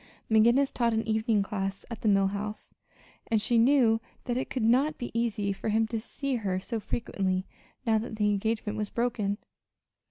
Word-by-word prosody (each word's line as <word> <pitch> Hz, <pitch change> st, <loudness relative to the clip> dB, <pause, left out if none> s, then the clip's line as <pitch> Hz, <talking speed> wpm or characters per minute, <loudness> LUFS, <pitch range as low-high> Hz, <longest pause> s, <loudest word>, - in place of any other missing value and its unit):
McGinnis 235 Hz, +5 st, +4 dB
taught 235 Hz, -2 st, +1 dB
an 220 Hz, 0 st, -1 dB
evening 220 Hz, -1 st, +2 dB
class 195 Hz, -1 st, -4 dB
at 230 Hz, -, -6 dB
the -, -, 0 dB
Mill 195 Hz, -1 st, +4 dB
House, 210 Hz, +2 st, -5 dB, 0.5 s
and 225 Hz, -, +2 dB
she 230 Hz, +2 st, +2 dB
knew 235 Hz, -3 st, +4 dB, 0.2 s
that 245 Hz, -, -2 dB
it 255 Hz, -, -2 dB
could 255 Hz, -, -2 dB
not 265 Hz, +7 st, +3 dB
be 240 Hz, -, -5 dB
easy 215 Hz, -4 st, 0 dB
for 195 Hz, -, -4 dB
him 220 Hz, +1 st, +3 dB
to 230 Hz, -, -1 dB
see 270 Hz, +3 st, -3 dB
her 190 Hz, -4 st, -1 dB
so 225 Hz, +4 st, -3 dB
frequently 190 Hz, -4 st, -2 dB, 0.4 s
now 220 Hz, -2 st, +3 dB
that 225 Hz, 0 st, -5 dB
the 210 Hz, -1 st, +2 dB
engagement 215 Hz, +1 st, -1 dB
was 210 Hz, -1 st, -2 dB
broken. 215 Hz, -4 st, -1 dB
220 Hz, 185 wpm, -28 LUFS, 205-235 Hz, 0.5 s, McGinnis